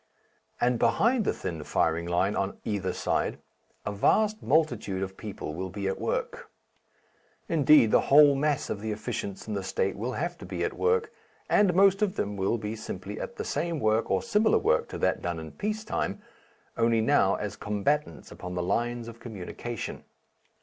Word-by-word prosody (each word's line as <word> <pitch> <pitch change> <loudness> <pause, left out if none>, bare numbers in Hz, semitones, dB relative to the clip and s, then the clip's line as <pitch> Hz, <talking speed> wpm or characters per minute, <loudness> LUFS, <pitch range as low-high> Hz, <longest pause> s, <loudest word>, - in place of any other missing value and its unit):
And 120 -1 +2
behind 225 - +3
the - - +2
thin 80 -3 -5
firing 80 +3 0
line 90 +4 +1
on 100 0 -2
either 100 -3 -1
side - - -1 0.5
a - - -1
vast 215 - +2
multitude 120 -9 +1
of 95 0 -6
people 100 -8 -6
will 95 +3 -4
be 100 +1 -4
at 95 - -2
work; - - -3 1.0
indeed, 150 -7 +5
the - - +5
whole 145 0 +8
mass 145 +1 0
of 100 - -4
the 110 0 -3
efficients 100 -1 -5
in 110 - -3
the 100 - -1
State 95 +1 -1
will 120 +5 -3
have 175 +5 -3
to - - -9
be - - -3
at - - -1
work, 460 -1 +1 0.4
and 195 -4 +4
most 195 +1 +5
of 205 -2 +1
them 105 - -2
will 100 +4 0
be 105 0 -4
simply 110 - -6
at - - -6
the - - -5
same 170 -2 -2
work 110 -1 +1
or - - +1
similar 220 -1 +3
work - - +1
to - - -5
that - - +1
done 85 -1 -3
in 80 -1 -8
peace 215 +2 -3
time 220 - -2 0.6
only 115 0 +3
now 110 -5 +3
as 105 -2 -4
combatants 105 - -2
upon 90 0 -7
the 90 - -1
lines 120 +5 -1
of 115 0 -10
communication. 115 +1 -6
115 Hz, 185 wpm, -28 LUFS, -, 1.0 s, whole